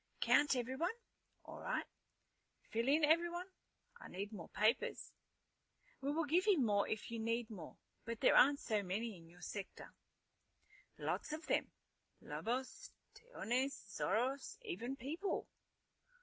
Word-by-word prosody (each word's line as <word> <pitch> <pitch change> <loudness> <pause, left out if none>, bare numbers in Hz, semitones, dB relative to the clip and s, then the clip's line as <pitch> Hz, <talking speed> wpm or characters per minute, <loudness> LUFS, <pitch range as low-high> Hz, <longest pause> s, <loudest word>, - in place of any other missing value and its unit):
"Count 290 -1 +5
everyone? 265 - -1 0.5
All - - -8
right. - - -1 0.9
Fill 230 +2 0
in 300 +3 +4
everyone? 345 +3 +2 0.5
I - - -9
need 200 +4 -5
more 180 -5 -7
papers." 220 +4 +1 0.9
"We 275 +1 0
will 325 +2 +1
give 350 +7 +3
you 395 -6 +6
more 205 -5 +3
if 220 +1 -3
you 230 - -3
need 230 +1 -1
more. 180 -7 -8 0.3
But 230 0 -4
there - - +5
aren't 280 +2 +7
so 215 -2 0
many 205 +4 -2
in 165 -2 -14
your 175 +1 -17
sector." 200 -2 -6 1.0
"Lots - - -2
of 315 +2 -5
them. - - +1 0.5
Lobos, 260 - -3 0.2
tejones, 275 - -1 0.2
zorros, 255 - 0
even 270 - -3
people." 310 - -2
250 Hz, 135 wpm, -38 LUFS, 220-310 Hz, 1.0 s, aren't